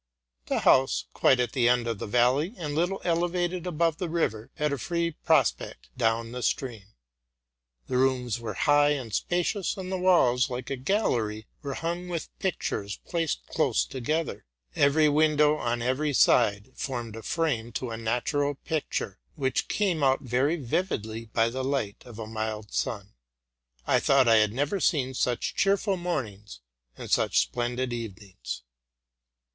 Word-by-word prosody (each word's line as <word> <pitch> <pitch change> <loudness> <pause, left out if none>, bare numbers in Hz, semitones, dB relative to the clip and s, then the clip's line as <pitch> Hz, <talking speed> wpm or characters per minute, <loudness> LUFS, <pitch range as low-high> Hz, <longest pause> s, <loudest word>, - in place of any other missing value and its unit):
The - - 0
house, 130 0 +4
quite 130 - +4
at 120 -2 0
the 120 -3 +3
end 120 -1 +2
of 115 -3 -3
the - - -4
valley, 125 - +2
and 150 -5 -4
little 175 +5 0
elevated 175 +1 0
above 165 -1 +1
the 180 -3 -3
river, 115 -10 -1
had 150 -1 0
a 140 - -3
free 170 +4 -1
prospect 150 -5 0
down 115 -1 0
the 125 0 -5
stream. 120 -6 -2 1.0
The 125 - -1
rooms 125 -3 +1
were 110 -4 -5
high 145 +5 +4
and 125 -7 -5
spacious; 180 - -1
and 185 -1 -5
the 190 - -1
walls, 145 -8 +4
like 125 +2 -5
a - - 0
gallery, 125 - 0 0.2
were 140 -3 -4
hung 175 +2 -3
with 170 -3 -4
pictures, 105 - -2
placed 165 -3 -2
close - - +1
together. 150 - -3 0.3
Every 150 +2 +4
win 155 +1 +3
dow 150 0 +4
on 120 -3 -2
every 140 +4 0
side 105 -3 +3
formed 120 -5 -4
a 115 - -7
frame 125 -7 -1
to 125 0 -3
a - - -3
natural 125 +6 0
picture, 155 - -3 0.2
which 130 -2 -1
came 185 -7 0
out 135 -1 +3
very 130 +6 +1
vividly 115 - -2
by 115 +1 +1
the 130 +2 -3
light 130 -6 -2
of 115 -3 -11
a 110 - -5
mild 110 -1 -4
sun. 100 -3 -3 0.7
I - - +3
thought 135 -2 +4
IT 115 -1 +6
had 105 -1 +2
never 145 - -1
seen 135 -8 +1
such 125 -1 -1
cheerful 195 0 +2
mornings 115 - -4 0.4
and - - -8
such - - +2
splendid 120 +1 -2
evenings. 105 - -7
130 Hz, 160 wpm, -27 LUFS, 115-160 Hz, 1.0 s, IT